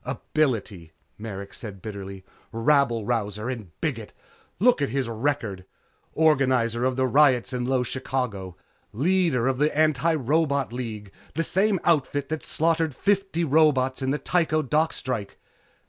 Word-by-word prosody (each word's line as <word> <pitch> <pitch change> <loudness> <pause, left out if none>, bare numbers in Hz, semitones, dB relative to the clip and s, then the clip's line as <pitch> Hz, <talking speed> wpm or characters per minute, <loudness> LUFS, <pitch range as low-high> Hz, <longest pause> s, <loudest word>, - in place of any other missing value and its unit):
"Ability," 115 - -2 0.3
Merrick 100 -2 -7
said 105 -4 -8
bitterly. 100 -2 -8 0.3
"Rabble 115 -2 +2
rouser 105 -1 -2
and 110 -8 -7
bigot! - - -3 0.5
Look 240 -5 +4
at 140 - +1
his 130 +1 -1
record. 115 -5 -2 0.5
Organizer 130 -6 +2
of 130 0 +1
the 130 0 +1
riots 130 -2 +3
in 125 -1 -2
Low 130 0 +1
Chicago. 125 -7 -4 0.4
Leader 155 - +2
in 135 -1 0
the 150 +1 +3
Antirobot 150 -2 +1
Labor - - -7
League 110 -5 -6 0.2
the 165 - +1
same 195 +2 +1
outfit 145 -3 +1
that 155 0 -3
slaughtered 160 -2 +1
fifty 195 -4 0
robots 140 -4 +3
in 130 - -1
the 145 - +1
Tycho 155 -2 +1
dock 155 +4 +1
strike. 115 -6 -5
130 Hz, 140 wpm, -25 LUFS, 115-155 Hz, 0.5 s, Look